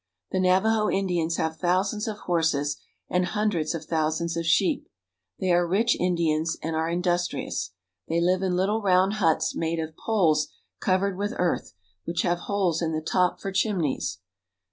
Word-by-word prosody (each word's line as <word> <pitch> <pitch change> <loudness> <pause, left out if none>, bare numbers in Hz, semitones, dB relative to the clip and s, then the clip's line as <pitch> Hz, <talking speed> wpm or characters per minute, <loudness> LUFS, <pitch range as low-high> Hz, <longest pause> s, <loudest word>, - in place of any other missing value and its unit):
The 190 - 0
Navajo 210 +4 +3
Indians 175 -4 0
have 160 0 -1
thousands 190 +4 0
of 215 -1 -3
horses, 160 -5 +1 0.3
and 180 0 +1
hun 210 +4 0
dreds 160 -3 -1
of 160 -1 -6
thousands 160 +1 -1
of 165 -1 -2
sheep. 180 +2 +2 0.5
They 185 - +1
are 175 0 +3
rich 220 +7 +2
Indians, 165 -3 0
and 160 +1 -2
are 160 +1 0
industrious. 175 - -1 0.4
They 165 +1 +1
live 180 +2 +2
in 185 -2 0
little 200 +5 +1
round 190 0 +3
huts 165 -3 +2
made 165 0 -1
of 160 -1 -4
poles 165 -9 +2 0.3
covered 190 0 +1
with 205 +1 -2
earth, 175 -1 -1 0.3
which 170 0 -1
have 175 -1 +1
holes 185 -5 +1
in 160 -1 -1
the 155 - -1
top 180 +3 +1
for 195 - -4
chimneys. 180 - 0
175 Hz, 165 wpm, -26 LUFS, 160-190 Hz, 0.5 s, Navajo